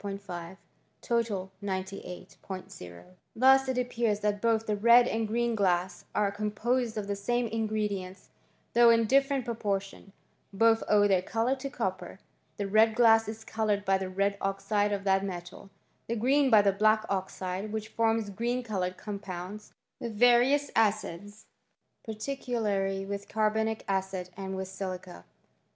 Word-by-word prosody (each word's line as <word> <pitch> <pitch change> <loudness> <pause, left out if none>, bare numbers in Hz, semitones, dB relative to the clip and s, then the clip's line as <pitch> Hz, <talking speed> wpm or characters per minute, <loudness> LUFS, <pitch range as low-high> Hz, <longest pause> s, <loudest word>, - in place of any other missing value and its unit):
5*5 190 -3 -6 1.0
98 190 -2 -6
Ot 90 - -9 0.2
Thus 265 +2 +5
it 260 - -1
appears 235 -4 0
that 205 -1 -1
both 225 -1 +1
the 210 - 0
red 235 +3 +6
and 225 -2 -1
green 235 +2 0
glass 185 -3 0
are 205 -1 +2
composed 220 +3 -1
of 210 - -2
the 200 0 -2
same 240 +5 -1
ingredients, 210 -4 -3 0.4
though 235 0 +6
in 230 0 +4
different 275 +1 +2
proportions. 200 -4 -3 0.4
Both 225 +3 +3
owe 205 -1 +5
their 190 -2 +3
colour 230 +7 0
to 275 +1 -5
copper. 190 -8 -4 0.4
The 205 - -2
red 220 +2 +4
glass 225 -2 +5
is 220 +1 -7
coloured 210 -3 -1
by 195 0 +2
the 190 -1 -4
red 200 +2 -1
oxide 205 +1 0
of 200 -1 -2
that 195 0 +2
metal; 180 0 -7 0.4
the 235 - -1
green 265 +5 +3
by 215 -4 +6
the 200 -1 +3
black 215 +2 +3
oxide, 190 +1 -3
which 220 0 -4
forms 225 -2 0
green 240 +5 -2
coloured 185 -5 -3
compounds, 200 0 -7 0.3
with 230 -2 -5
various 245 +5 +4
acids, 205 -1 -1 0.6
particularly 215 -5 -2
with 200 0 -6
carbonic 220 +1 0
acid 190 -2 -2
and 190 0 -5
with 190 0 -4
silica. 185 - -7
210 Hz, 145 wpm, -29 LUFS, 195-225 Hz, 1.0 s, red